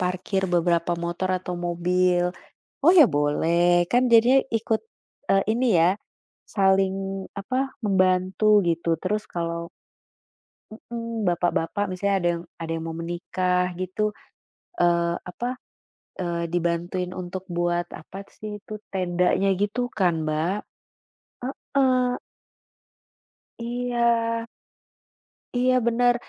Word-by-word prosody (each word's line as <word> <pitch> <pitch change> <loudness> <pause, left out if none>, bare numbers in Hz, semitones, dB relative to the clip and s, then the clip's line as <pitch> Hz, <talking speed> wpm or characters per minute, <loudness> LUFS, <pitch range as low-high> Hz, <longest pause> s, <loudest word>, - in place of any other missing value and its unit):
parkir 185 +2 -1
beberapa 170 0 +2
motor 175 +2 -2
atau 180 -1 -5
mobil? 175 +1 +2 0.6
Oh 340 - +8
ya 325 - +9
boleh. 170 +4 +3
Kan 245 - +5
jadinya 245 +4 +7
ikut, 225 0 0 0.5
eee, 195 0 +4
ini 245 +3 +1
ya, 170 +2 +5 0.6
saling 195 -1 +1
apa, 260 +6 -2
membantu 190 +2 +3
gitu, 170 0 -1
terus 210 +3 -1
kalau 170 0 -3 1.0
mhm, 230 -1 -5
bapak-bapak 175 +3 0
misalnya 195 +2 0
ada 175 - +2
yang - - -9 0.2
ada 165 - -5
yang 165 0 -4
mau 165 - -4
menikah 180 +2 -1
gitu, 185 +4 -2 0.6
eee, 170 0 +3 0.2
apa 245 +7 -4 0.6
eee, 170 -2 -2
dibantuin 175 +1 -1
untuk 185 0 -6
buat 175 0 0
apa 195 +5 -9
sih, 210 -1 -7
itu 215 +1 -9 0.2
tendanya 180 +1 +1
gitu 245 +4 -1
kan, 180 -5 +2
Mbak? 155 +6 0 1.2
Heeh. 255 -2 +3 1.5
Iya. 235 -1 0 1.1
Iya 255 0 +3
bener, 240 +1 +3
185 Hz, 105 wpm, -25 LUFS, 175-220 Hz, 1.5 s, ya